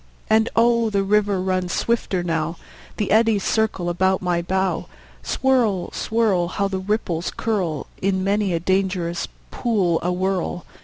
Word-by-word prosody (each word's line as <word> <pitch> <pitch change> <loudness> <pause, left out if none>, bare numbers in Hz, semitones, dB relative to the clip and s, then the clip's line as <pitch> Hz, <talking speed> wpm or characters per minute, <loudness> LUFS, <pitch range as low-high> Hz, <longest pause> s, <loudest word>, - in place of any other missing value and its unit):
And 220 +1 +4
oh, 235 0 +3
the 200 -2 +1
river 205 -1 +2
runs 185 -1 -1
swifter 215 -6 0
now; 165 -1 -1 0.4
The 210 - -1
eddies 220 -2 +3
circle 220 -5 0
about 190 +2 +2
my 175 -2 0
bow. 190 0 -1 0.3
Swirl, 225 - +1
swirl! 215 -6 +1
How 200 +3 -1
the 190 -1 -3
ripples 185 -4 -1
curl 185 -10 -1 0.2
In 190 -1 +1
many 200 0 +1
a 165 - +1
dangerous 185 -1 0 0.2
pool 195 -9 +1
awhirl! 180 0 -1
190 Hz, 140 wpm, -22 LUFS, 175-215 Hz, 0.4 s, And